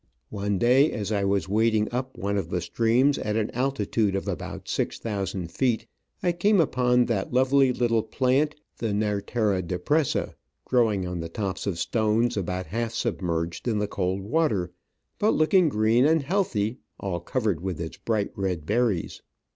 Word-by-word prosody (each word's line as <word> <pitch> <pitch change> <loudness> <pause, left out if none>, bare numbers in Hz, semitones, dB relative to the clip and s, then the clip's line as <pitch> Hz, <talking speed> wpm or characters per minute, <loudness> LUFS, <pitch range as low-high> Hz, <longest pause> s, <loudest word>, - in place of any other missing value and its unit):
One 100 -1 -1
day, 130 +7 +4
as 105 -2 -3
I 100 -2 +1
was 100 -3 +1
wading 110 +1 +2
up 130 +2 -4
one 100 +1 -2
of 95 -5 -2
the 90 - -1
streams 120 - +2
at 105 0 -2
an 110 -1 0
altitude 115 -5 0
of 95 - -3
about - - -5
six - - -1
thousand 95 -5 -4
feet, 125 -4 0 0.4
I 175 - +3
came 195 +4 +2
upon 125 -5 +3
that 105 -5 -2
lovely 130 +1 +4
little 120 -2 +1
plant, 135 +6 +1 0.2
the 110 -3 -1
Nerlera 105 -1 0
depressay 95 - 0 0.3
growing 110 -7 +2
on 90 -1 -4
the 85 0 -5
tops 95 +1 -3
of 95 -4 -1
stones 115 +4 +1
about 95 -1 -2
half 115 +1 -3
submerged 85 -6 -2
in 110 -3 +1
the 105 0 0
cold 95 0 -2
water, 110 - 0 0.5
but 215 - +3
looking 165 +2 +4
green 110 +1 +3
and 160 -1 +3
healthy, 135 - 0 0.2
all 95 -3 -3
covered 100 -2 -1
with 90 -3 -3
its 85 -1 -5
bright 110 -3 -1
red 90 -6 -2
berries. 110 -3 0
110 Hz, 165 wpm, -26 LUFS, 95-125 Hz, 0.5 s, day